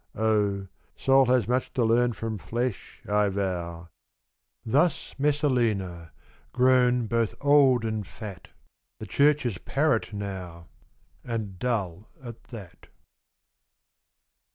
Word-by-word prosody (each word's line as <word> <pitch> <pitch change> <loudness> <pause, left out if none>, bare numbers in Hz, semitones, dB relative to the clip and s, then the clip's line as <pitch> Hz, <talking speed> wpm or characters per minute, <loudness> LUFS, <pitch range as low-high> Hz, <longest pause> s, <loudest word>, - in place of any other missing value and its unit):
O! 105 -3 +1 0.3
soul 135 -1 +4
has 125 -3 +2
much 125 +2 0
to 120 - +1
learn 120 +2 +3
from 110 -1 -5
flesh, 120 +1 -4
I 105 0 +2
vow.' 90 -3 -4 0.8
Thus 150 +10 +1
Messalina, 115 - 0 0.4
grown 125 -1 +3
both 115 0 0
old 140 -4 +4
and 110 -3 -3
fat, 100 -6 -9 0.3
— - - -58
The 110 - -6
Church's 140 -4 +2
parrot 140 -7 0
now, 95 -5 -7 0.5
and 110 -6 -5
dull 105 -6 -2
at 120 -4 -11
that. 95 -7 -12
110 Hz, 105 wpm, -26 LUFS, 100-125 Hz, 0.8 s, soul